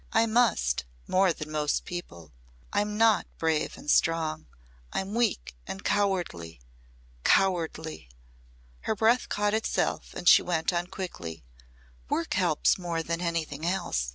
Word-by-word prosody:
"I 225 +1 +4
must 220 - +2 0.2
more 185 0 +3
than 155 -2 -6
most 150 -1 0
people. 85 - -8 0.4
I'm 210 0 0
not 225 -1 +4
brave 160 -2 0
and - - -13
strong. 160 0 +1 0.4
I'm 190 +2 -3
weak 230 - 0
and 195 - -6
cowardly 180 - -1 0.6
cowardly." 160 - +1 0.8
Her - - +2
breath 225 +4 +2
caught 205 0 0
itself 220 0 -1
and 175 - -5
she - - +9
went 170 0 0
on 175 0 -1
quickly, 85 - -7 0.7
"Work 165 - -1
helps 180 -2 +2
more 170 -2 -2
than 170 +1 -3
anything 160 -4 -2
else. 175 - -1
175 Hz, 130 wpm, -28 LUFS, 155-200 Hz, 0.8 s, she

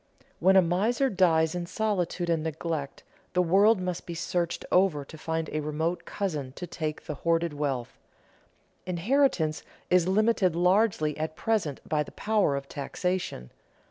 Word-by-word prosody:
When 190 +3 +5
a 190 - +7
miser 220 +10 +1
dies 165 -4 +3
in 175 -1 -4
solitude 180 -4 -1
and 165 -2 +1
neglect, 160 -2 -4 0.3
the 180 - +3
world 200 +5 +4
must 180 -1 -4
be 170 - -5
searched 170 0 -2
over 180 -7 +3
to 160 - -12
find 160 +1 -3
a 155 - 0
remote 155 +3 -2
cousin 150 -10 -3
to 180 - -6
take 155 -3 -5
the 150 - -4
hoarded 165 +2 0
wealth. 140 -5 -3 0.9
Inheritance 180 - +1 0.3
is 180 -1 +4
limited 200 -3 +2
largely 180 -4 +2
at 155 0 -3
present 190 -11 -1
by 150 0 +1
the 150 - -6
power 210 -9 +1
of 140 0 -5
taxation. 165 - -3
170 Hz, 150 wpm, -28 LUFS, 155-190 Hz, 0.9 s, a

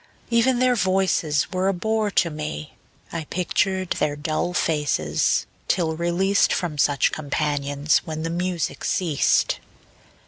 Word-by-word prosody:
Even 240 +2 +3
their 255 0 +3
voices 185 -6 +1
were 185 0 0
a 195 - +1
bore 220 +3 0
to 175 -4 +1
me; 150 - -5 0.4
I 165 -2 -4
pictured 185 +2 -1
their 150 -1 0
dull 155 +4 -2
faces, 145 - +1 0.2
till 165 -3 +1
released 175 +4 +2
From 165 -5 -2
such 140 -2 +3
companions, 145 -1 0
when 155 -2 -6
the 165 - -2
music 175 -5 -2
ceased. 165 -6 +1
170 Hz, 130 wpm, -23 LUFS, 150-190 Hz, 0.4 s, Even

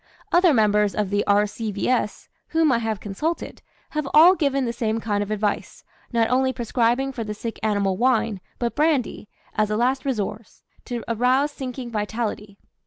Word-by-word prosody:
Other 350 -1 +5
members 210 -4 +3
of 205 -2 -1
the 205 0 +1
R.C.V.S., 210 +2 0 0.2
whom 320 -2 +2
I 235 - +2
have 220 -3 -2
consulted, 295 - -4 0.3
have 305 -2 -2
all 335 +4 +9
given 275 -6 0
the 235 - -2
same 225 -1 -1
kind 205 -2 -1
of 205 - -3
advice, 210 -1 -2 0.3
not 230 -2 +2
only 260 +1 +3
prescribing 245 +2 0
for 240 -3 -4
the 210 -1 -5
sick 225 +2 -6
animal 200 -3 0
wine, 230 -5 +1 0.2
but 235 -1 -2
brandy, 295 -8 0 0.2
as 215 -1 +1
a 210 - 0
last 255 +3 +1
resource, 215 -4 -4 0.2
to 240 -2 -4
arouse 255 +5 +2
sinking 255 -3 -6
vitality. 210 -1 -3
230 Hz, 165 wpm, -23 LUFS, 210-260 Hz, 0.3 s, all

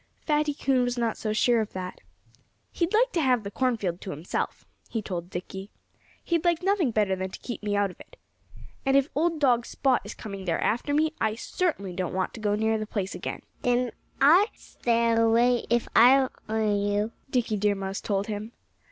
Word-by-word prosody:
Fatty 300 -1 +1
Coon 265 -3 +2
was 245 0 -1
not 235 -2 0
so 215 - -3
sure 230 +2 +3
of 215 - -5
that. 185 -1 -6 0.7
"He'd 340 0 -1
like 485 +3 +3
to 340 - 0
have 250 -5 +2
the 200 - -6
cornfield 215 -9 -1
to - - -7
himself," 160 +1 -4 0.2
he 230 - -2
told 180 -4 -5
Dickie. 190 +2 -6 0.5
"He'd 335 -2 0
like 345 -1 +1
nothing 385 -7 +2
better 210 -4 +1
than 190 0 -3
to - - -8
keep 240 - -6
me 205 -1 -1
out 200 -2 +1
of - - -19
it. - - -15 0.7
And 270 0 +4
if 275 +2 +2
old 325 +2 +1
dog 245 -5 +3
Spot 265 -3 +1
is - - -8
coming 195 -3 -7
there 170 -2 0
after 240 +6 0
me, 310 +2 +2
I 220 -1 +1
certainly 230 - -2
don't 180 0 -3
want 185 0 -1
to - - -8
go 205 -1 +1
near 220 +1 +1
the 215 - -4
place 200 -4 -3
again." - - -5 0.2
"Then 245 0 +1 0.3
I'd 345 +10 +6
stay 235 -1 0
away, 230 +2 +3
if 235 0 +2
I 260 +2 +7 0.2
were 220 0 0
you," 205 +1 +1 0.2
Dickie 240 -5 0
Deer 205 0 +2
Mouse 195 0 -4
told 200 -1 -1
him. 215 +2 -5
230 Hz, 200 wpm, -27 LUFS, 205-270 Hz, 0.7 s, I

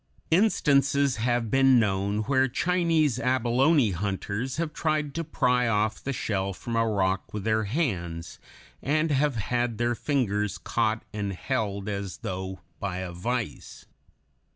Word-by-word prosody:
Instances 140 - +3
have 120 0 0
been 135 -2 +5
known 100 0 0
where 130 +1 +2
Chinese 165 -3 +1
abalone 130 +1 +3
hunters 100 - -3
have 160 -2 -2
tried 155 -3 -1
to 165 - -2
pry 125 -5 +1
off 110 -1 0
the 140 - -2
shell 100 -6 -2
from 115 +5 -5
a 115 0 +2
rock 95 -3 0
with 105 - -3
their 110 0 +1
hands, 90 - -3 0.4
and 155 +3 +1
have 145 -1 +2
had 120 +2 -1
their 120 +1 +1
fingers 105 -7 -1
caught 110 -1 -1
and 100 -2 -2
held 100 -2 -2
as 100 -2 -4
though 95 0 -4 0.2
by 95 -3 -3
a 95 -1 -4
vice. 115 +6 -4
115 Hz, 140 wpm, -27 LUFS, 100-140 Hz, 0.4 s, been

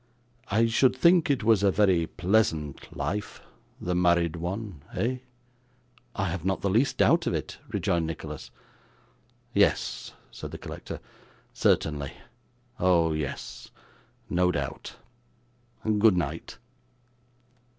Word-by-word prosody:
I 110 +3 +3
should 120 +3 +3
think 170 +4 +5
it 135 -6 +1
was 110 -3 +4
a 100 - +4
very 95 -5 +3
pleasant 90 -7 0
life, 105 0 -3 0.4
the 90 - -2
married 85 -2 +3
one, 90 0 -5
eh?' 125 +3 0 1.0
'I 95 - 0
have 85 -1 -3
not 95 +1 0
the 100 - +1
least 120 +7 +2
doubt - - +4
of - - +1
it,' - - -5
rejoined 85 -2 0
Nicholas. 80 - -6 1.0
'Yes,' - - +1 0.2
said - - -7
the - - -7
collector; - - -7 0.5
'certainly. 75 -3 +1 0.7
Oh 85 -3 +3
yes. 70 -5 -5 0.6
No 90 0 +2
doubt. 85 - -4 0.9
Good 105 -2 +4
night. 90 - -3
90 Hz, 115 wpm, -27 LUFS, 85-110 Hz, 1.0 s, think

